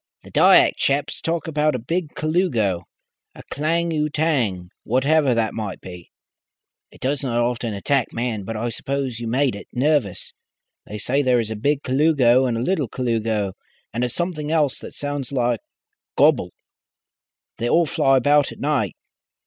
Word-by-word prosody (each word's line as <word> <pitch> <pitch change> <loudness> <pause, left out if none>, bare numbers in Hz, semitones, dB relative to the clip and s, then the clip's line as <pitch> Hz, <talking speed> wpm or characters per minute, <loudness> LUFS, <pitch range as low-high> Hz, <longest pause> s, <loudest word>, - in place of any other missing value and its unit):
"The - - -14
Dyak - - +5
chaps 140 +1 -1
talk 165 +1 -2
about 150 -2 +1
a - - 0
Big 160 +7 -3
Colugo, 140 - 0 0.5
a - - -11
Klang 165 +4 0
utang 150 - 0
whatever 135 +2 +2
that 115 -1 0
may 105 -4 -4
be. 90 -2 -11 0.8
It - - -18
does 140 +2 -1
not 125 -4 -2
often 120 -2 -1
attack 130 +5 0
man, 115 -3 -3
but 110 +3 -5
I 120 +2 -2
suppose 135 -1 -3
you 120 - -5
made 130 +1 +1
it 100 - -10
nervous. 130 - 0 0.5
They 105 - -6
say 130 +7 0
there 125 -3 +3
is 110 -1 -3
a - - -3
Big 140 +6 0
Colugo 130 -2 +3
and 120 -2 -1
a - - -2
Little 155 -4 0
Colugo, 110 -5 -1 0.4
and 120 +2 -1
a 125 - 0
something 160 0 -2
else 150 -5 +1
that - - -10
sounds 145 -2 -4
like 120 -4 0 0.6
gobble. - - +4 1.1
They 120 - -1
all 170 +5 +4
fly 135 -2 +2
about 145 +2 +3
at - - -10
night. 140 -9 0
130 Hz, 165 wpm, -22 LUFS, 115-150 Hz, 1.1 s, Dyak